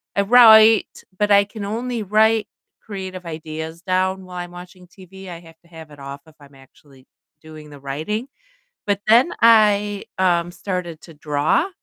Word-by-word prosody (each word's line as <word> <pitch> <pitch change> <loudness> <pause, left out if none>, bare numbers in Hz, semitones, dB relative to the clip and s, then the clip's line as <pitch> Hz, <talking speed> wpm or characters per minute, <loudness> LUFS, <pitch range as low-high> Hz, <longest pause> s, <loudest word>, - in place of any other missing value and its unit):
I 200 - +1
write, 220 -1 +5 0.2
but 210 0 0
I 200 0 +6
can 205 0 -9
only 230 +2 -4
write 215 +2 +2 0.3
creative 190 -3 -8
ideas 160 0 -8
down 190 0 -1
while 180 -1 -10
I'm 175 0 -7
watching 180 +1 -13
TV, 190 +1 -14
I 170 -1 -9
have 165 -1 -18
to - - -24
have 160 -2 -13
it 145 - -15
off 140 +1 -9
if 160 - -20
I'm 140 -1 -18
actually 135 0 -21 0.4
doing 155 -1 -13
the 145 - -13
writing, 155 - -5 0.6
but 200 -1 -1
then 245 +9 +4
I, 210 -3 +3
um, 175 -2 +1
started 175 -3 -6
to 165 - -14
draw, 150 - -1
185 Hz, 165 wpm, -20 LUFS, 160-210 Hz, 0.6 s, I